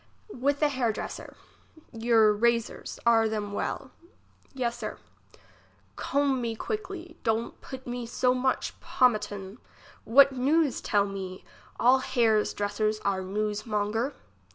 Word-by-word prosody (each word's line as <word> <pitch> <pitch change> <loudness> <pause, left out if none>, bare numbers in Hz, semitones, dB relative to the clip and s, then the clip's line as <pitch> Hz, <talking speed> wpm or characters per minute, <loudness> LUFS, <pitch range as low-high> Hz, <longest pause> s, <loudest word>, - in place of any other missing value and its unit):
IFith 285 +4 0
a 300 - +5
liair 250 -4 +1
dresser. - - -7 0.6
Your 225 -2 +4
razors, 235 +2 0
are 225 -1 +5
them 210 -2 -3
well? 260 +5 -3 0.6
Yes, 240 -3 -2
Sir. 240 -3 -6 1.0
Comb 275 -2 0
me 230 -1 -2
quickly; 360 - -5
don't 225 +1 -1
put 260 -1 -9
me 245 -1 -4
so 250 +2 +2
much 255 +1 0
po 255 - +2
matum. 205 -2 -1 0.4
What 275 +4 +6
news 280 +2 +1
tell 205 -1 +2
me? 190 -2 -6 0.3
all 255 +2 +5
hairs 230 -5 +2
dresser 205 +1 0
are 195 -1 +1
newsmonger. 210 +4 -1
235 Hz, 125 wpm, -28 LUFS, 210-260 Hz, 1.0 s, What